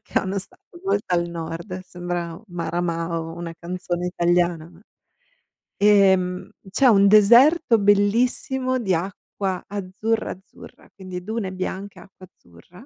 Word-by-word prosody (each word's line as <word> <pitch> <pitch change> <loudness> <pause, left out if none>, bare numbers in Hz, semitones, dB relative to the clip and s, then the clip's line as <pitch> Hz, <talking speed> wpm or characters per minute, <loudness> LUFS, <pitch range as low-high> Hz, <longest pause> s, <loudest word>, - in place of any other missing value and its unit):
che - - -22
è - - +6
uno 190 +1 -3
stato 345 - -13
molto 205 - 0
al 170 0 0
nord, 170 +3 -6
sembra 175 -1 -5
Maramao, 165 -1 -3
una 170 -1 -6
canzone 175 0 -4
italiana 175 -2 +1
ma 175 +1 -19 1.0
ehm, 190 -3 +3 0.2
c'è 260 +7 +3
un 200 -3 +6
deserto 235 - +6
bellissimo 245 +6 +1
di 195 -5 0
acqua 190 +1 -3
azzurra, 205 +3 -2
azzurra, 190 +2 -14
quindi 185 -2 -7
dune 210 -3 -4
bianche 190 +2 -5
acqua 190 0 -15
azzurra 175 - -19
185 Hz, 125 wpm, -23 LUFS, 175-205 Hz, 1.0 s, è